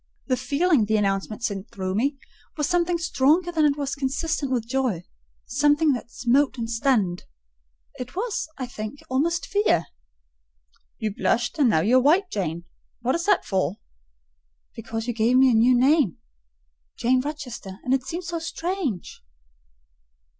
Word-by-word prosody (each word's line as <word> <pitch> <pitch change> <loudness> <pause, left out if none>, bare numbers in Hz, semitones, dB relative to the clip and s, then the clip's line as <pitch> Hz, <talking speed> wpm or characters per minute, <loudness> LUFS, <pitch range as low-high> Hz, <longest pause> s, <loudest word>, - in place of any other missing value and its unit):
The 255 - +1
feeling, 285 -2 +2
the 220 +1 +1
announcement 200 +2 -1
sent 200 -3 -3
through 185 -1 -4
me, 275 +7 0 0.4
was 300 - 0
something 350 0 +1
stronger 335 +1 +2
than 310 -3 +3
was 280 -1 -2
consistent 280 +1 -2
with 235 -3 -1
joy—something 265 - 0
that 240 -1 -5
smote 260 +3 +1
and 230 -1 -3
stunned: 225 -7 0 0.7
it 250 +3 -7
was, 410 -4 -2
I 260 - -3
think 220 +2 -7
almost 330 +6 +1
fear. 405 - +2 1.1
"You 215 -2 -2
blushed, 240 +8 0
and 270 -5 +5
now 160 -7 +3
you 230 +9 +4
are - - +1
white, 355 +8 +3
Jane: 170 -4 -3 0.4
what 250 +2 +1
is 340 +1 -1
that 410 - +3
for?" 190 0 -1 1.0
"Because 225 0 -5
you 240 - -1
gave 230 +3 +3
me 260 0 +6
a - - +2
new 240 +3 +5
name—Jane 60 - -1
Rochester; 255 -9 -6
and 255 - 0
it 265 -2 +1
seems 340 +5 -5
so 340 -1 -2
strange." 330 - -4
255 Hz, 145 wpm, -24 LUFS, 215-295 Hz, 1.1 s, me